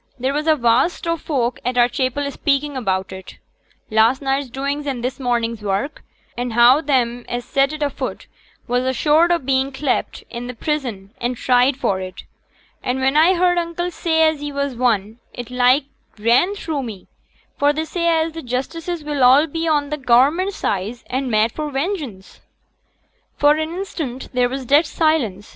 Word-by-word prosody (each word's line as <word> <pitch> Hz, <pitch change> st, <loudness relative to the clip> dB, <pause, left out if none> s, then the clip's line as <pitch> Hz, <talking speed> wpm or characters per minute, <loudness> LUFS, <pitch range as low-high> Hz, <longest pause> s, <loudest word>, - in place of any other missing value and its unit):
There 260 Hz, +2 st, -1 dB
was 300 Hz, +2 st, -2 dB
a 315 Hz, -, +5 dB
vast 250 Hz, +7 st, +1 dB
o' 335 Hz, -, +1 dB
folk 255 Hz, -6 st, -2 dB
at 250 Hz, +1 st, -2 dB
our 240 Hz, 0 st, +6 dB
chapel 270 Hz, +3 st, -2 dB
speaking 285 Hz, 0 st, 0 dB
about 190 Hz, -7 st, -1 dB
it 190 Hz, -1 st, -10 dB, 0.5 s
last 225 Hz, +4 st, +4 dB
night's 270 Hz, -1 st, -1 dB
doings 280 Hz, +3 st, -3 dB
and 255 Hz, -4 st, -3 dB
this 250 Hz, +2 st, -3 dB
morning's 235 Hz, -3 st, -1 dB
work 205 Hz, +8 st, -2 dB, 0.3 s
and 245 Hz, -1 st, -3 dB
how 240 Hz, +5 st, +6 dB
them 245 Hz, -5 st, 0 dB
as 240 Hz, 0 st, -3 dB
set 275 Hz, 0 st, +1 dB
it 305 Hz, -1 st, -3 dB
afoot 285 Hz, -, -4 dB, 0.4 s
was 245 Hz, +1 st, +1 dB
assured 300 Hz, +6 st, +3 dB
o' 345 Hz, -, +4 dB
being 270 Hz, -2 st, 0 dB
clapt 270 Hz, 0 st, -2 dB
int' 245 Hz, 0 st, -7 dB
prison 240 Hz, -10 st, -3 dB
and 245 Hz, +1 st, -1 dB
tried 250 Hz, +2 st, +3 dB
for 195 Hz, -8 st, -1 dB
it; 185 Hz, 0 st, -8 dB, 0.6 s
and 250 Hz, +1 st, -2 dB
when 265 Hz, +2 st, +1 dB
I 330 Hz, +5 st, +5 dB
heered 355 Hz, 0 st, +3 dB
uncle 345 Hz, +1 st, -3 dB
say 320 Hz, -1 st, +1 dB
as 315 Hz, -2 st, 0 dB
he 290 Hz, 0 st, -4 dB
was 280 Hz, -1 st, -2 dB
one, 225 Hz, -2 st, 0 dB, 0.2 s
it 245 Hz, -1 st, -7 dB
like 250 Hz, +3 st, +3 dB, 0.3 s
ran 240 Hz, -, +3 dB
through 315 Hz, -7 st, -3 dB
me; 220 Hz, -7 st, -8 dB, 0.5 s
for 285 Hz, 0 st, +4 dB
they 310 Hz, +2 st, -2 dB
say 340 Hz, +2 st, -2 dB
as 325 Hz, -1 st, +2 dB
t' 325 Hz, +1 st, -7 dB
justices 320 Hz, +7 st, -4 dB
will 285 Hz, -1 st, +4 dB
be 325 Hz, +1 st, -3 dB
all 315 Hz, -, +3 dB
on 290 Hz, 0 st, -2 dB
t' 300 Hz, -, -1 dB
Government 280 Hz, +9 st, +3 dB
side, 205 Hz, -, -2 dB, 0.2 s
and 260 Hz, +1 st, -1 dB
mad 220 Hz, 0 st, +2 dB
for 305 Hz, +3 st, -4 dB
vengeance.' 275 Hz, -, -4 dB, 1.0 s
For 290 Hz, 0 st, +5 dB
an 315 Hz, +1 st, -2 dB
instant 320 Hz, -9 st, -5 dB
there 250 Hz, -1 st, +2 dB
was 265 Hz, 0 st, -5 dB
dead 290 Hz, +5 st, +4 dB
silence. 255 Hz, -, 0 dB
270 Hz, 180 wpm, -20 LUFS, 240-305 Hz, 1.0 s, our